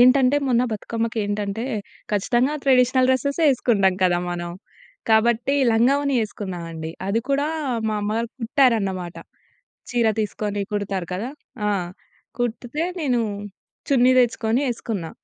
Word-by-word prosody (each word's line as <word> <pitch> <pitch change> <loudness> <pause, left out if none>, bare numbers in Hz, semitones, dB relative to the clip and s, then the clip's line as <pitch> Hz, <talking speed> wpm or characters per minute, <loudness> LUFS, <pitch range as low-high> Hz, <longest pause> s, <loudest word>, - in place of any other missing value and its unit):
ఏంటంటే, 255 +2 +6
మొన్న 245 -1 +3
బతుకమ్మకి 225 +2 -3
ఏంటంటే, 205 +2 -2 0.5
ఖచ్చితంగా 240 +7 +2
ట్రెడిషనల్ 255 -1 +4
డ్రెసెస్సే 280 +5 +1
యేసుకుంటాం 210 -7 +2
కదా! 175 -1 +3
మనం. 175 0 -4 0.6
కాబట్టి 235 +4 +3 0.2
లంగాఓణి 275 +5 +3
యేసుకున్నా 200 -4 -4
అండి. 160 -1 -6 0.2
అది 205 +4 +1
కూడా 280 +1 +1 0.4
మా 215 - -1
అమ్మగారు 220 +3 -1
కుట్టారన్నమాట. 225 - +1 0.7
చీర 235 -2 +2
తీసుకొని 205 -1 -2
కుడతారు 195 -3 -2
కదా! 220 +8 -3 0.4
ఆ! - - +2 0.7
కుట్టితే 245 +5 -2 0.2
నేను 255 -6 +1 0.7
చున్నీ 255 -2 +5
తెచ్చుకొని 235 -1 +2
యేసుకున్నా. 215 -8 -4
230 Hz, 115 wpm, -23 LUFS, 205-255 Hz, 0.7 s, ఏంటంటే